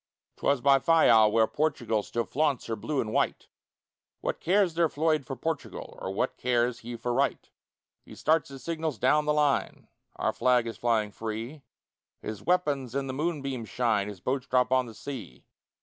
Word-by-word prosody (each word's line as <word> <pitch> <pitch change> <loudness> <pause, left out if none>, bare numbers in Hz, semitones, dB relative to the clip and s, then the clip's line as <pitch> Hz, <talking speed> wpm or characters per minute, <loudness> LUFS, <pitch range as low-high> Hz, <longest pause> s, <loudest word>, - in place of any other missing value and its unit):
'Twas 140 -3 +1
by 140 +1 +5
Fayal, 120 -9 +5
where 110 0 +4
Portugal 120 -7 0
Still 115 +3 -2
flaunts 145 -3 0
her 115 - -2
Blue 140 +7 -3
and 110 -1 -4
White; - - 0 0.7
What - - -2
cares 185 0 +2
their 165 -1 +2
Floyd 155 -1 0
for 135 - -4
Portugal 160 +1 -5
Or - - -3
what 95 - -2
cares 120 -1 +1
he 120 +1 -7
for 120 +1 -2
right? - - 0 0.5
He - - -13
starts 160 -1 +1
his 135 -1 -10
signals 160 -5 -3
down 150 +6 +3
the 150 - +2
line 150 -2 0 0.3
Our - - -1
flag 125 -2 +3
is 115 - -5
flying 110 -3 +1
free 115 +7 -5 0.6
His 110 -2 -6
weapons 145 -8 0
in 140 0 0
the 130 - -4
moonbeams 140 - -3
shine, 110 -3 +1
His 100 -4 -8
boats 130 +4 -2
drop 125 0 +2
on 130 -1 +3
the 115 - -11
sea. 105 - -8
130 Hz, 180 wpm, -28 LUFS, 115-150 Hz, 0.7 s, by